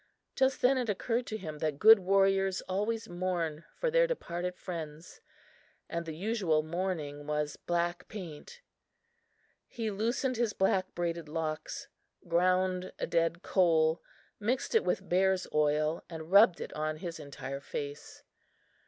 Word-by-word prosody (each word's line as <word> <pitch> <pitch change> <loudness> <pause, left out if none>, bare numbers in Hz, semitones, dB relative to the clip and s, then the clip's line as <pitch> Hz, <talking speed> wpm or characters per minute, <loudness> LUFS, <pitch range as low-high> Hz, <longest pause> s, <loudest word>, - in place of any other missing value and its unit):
Just 265 0 +1
then 260 +1 +5
it 240 -3 -2
occurred 230 +4 -1
to 215 - -3
him 155 -7 -7
that 155 -2 -1
good 220 +5 +8
warriors 195 0 +2
always 210 +4 -2
mourn 175 -3 -2
for - - -1
their - - +4
departed 180 - -3
friends 160 -2 -7 0.7
and 170 0 -4
the 160 - -5
usual 185 -5 +1
mourning 155 -4 -3
was 150 -1 -1
black 175 +1 -2
paint. 195 - -9 1.1
He 225 -2 -3
loosened 235 +5 0
his 230 -3 +1
black 190 -1 +1
braided 170 -2 -2
locks, 155 -1 -4 0.4
ground 185 +1 +2
a - - -2
dead 165 0 0
coal, 165 -3 +3 0.4
mixed 235 +5 -1
it 450 - +4
with - - -1
bear's 190 +1 +2
oil 150 +1 +2
and 160 0 -8
rubbed 200 -3 +7
it - - -6
on 155 0 -2
his 170 0 -6
entire 140 -2 -6
face. 145 +1 -7
175 Hz, 140 wpm, -31 LUFS, 160-200 Hz, 1.1 s, good